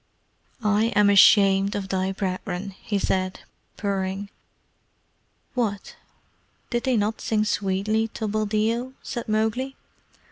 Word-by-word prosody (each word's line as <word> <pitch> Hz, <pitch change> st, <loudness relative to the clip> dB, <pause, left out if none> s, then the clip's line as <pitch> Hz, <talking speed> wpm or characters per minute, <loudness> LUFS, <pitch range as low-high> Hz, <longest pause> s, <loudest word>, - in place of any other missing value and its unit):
"I 210 Hz, +1 st, +3 dB
am 205 Hz, -1 st, +5 dB
ashamed 195 Hz, 0 st, +6 dB
of 195 Hz, -1 st, -4 dB
thy 190 Hz, 0 st, 0 dB
brethren," 190 Hz, 0 st, -3 dB
he 205 Hz, -, -1 dB
said, 185 Hz, -1 st, -1 dB, 0.4 s
purring. 195 Hz, 0 st, -2 dB, 1.2 s
"What? 215 Hz, -6 st, -2 dB, 0.8 s
Did 240 Hz, -1 st, -1 dB
they 255 Hz, -3 st, +2 dB
not 215 Hz, +1 st, -1 dB
sing 215 Hz, -1 st, +1 dB
sweetly 210 Hz, +2 st, 0 dB
to 220 Hz, -, -2 dB
Buldeo?" 215 Hz, +4 st, 0 dB
said 240 Hz, -, -5 dB
Mowgli. 220 Hz, +5 st, 0 dB
205 Hz, 110 wpm, -24 LUFS, 195-220 Hz, 1.2 s, ashamed